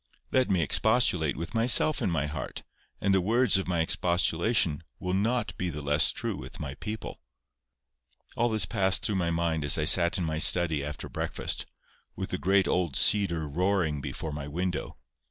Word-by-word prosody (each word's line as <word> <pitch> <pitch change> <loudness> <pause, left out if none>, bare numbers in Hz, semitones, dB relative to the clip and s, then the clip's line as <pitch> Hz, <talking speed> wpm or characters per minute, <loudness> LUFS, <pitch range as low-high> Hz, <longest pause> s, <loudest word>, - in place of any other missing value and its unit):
Let 130 -1 +2
me 90 -4 +1
expostulate 90 - +2
with 85 +6 -6
myself 120 +6 +3
in 105 - 0
my 80 -4 -1
heart, 75 -2 -6 0.4
and 100 0 +1
the 95 - +3
words 115 +2 +3
of 95 - -5
my 85 -2 0
expostulation 85 0 +1 0.2
will 90 -1 -4
not 110 +4 -1
be 90 - -2
the 75 -2 -7
less 75 +1 +3
true - - -4
with - - -10
my - - -5
people." 110 +1 -7 1.2
All 120 +1 +1
this 110 -1 +2
passed 95 -1 0
through 105 - 0
my 85 -2 -1
mind 85 -2 -1
as 70 - +3
I 75 - -1
sat 85 +3 +5
in 90 - -2
my 80 -1 -2
study 80 -4 +3
after 75 0 -6
breakfast, - - -3 0.5
with - - -6
the - - -3
great 95 +1 +2
old 85 -6 -1
cedar 85 -7 +3
roaring 85 -1 -1
before 80 +3 -6
my 75 -1 -6
window. 90 +4 -4
90 Hz, 180 wpm, -27 LUFS, 80-100 Hz, 1.2 s, sat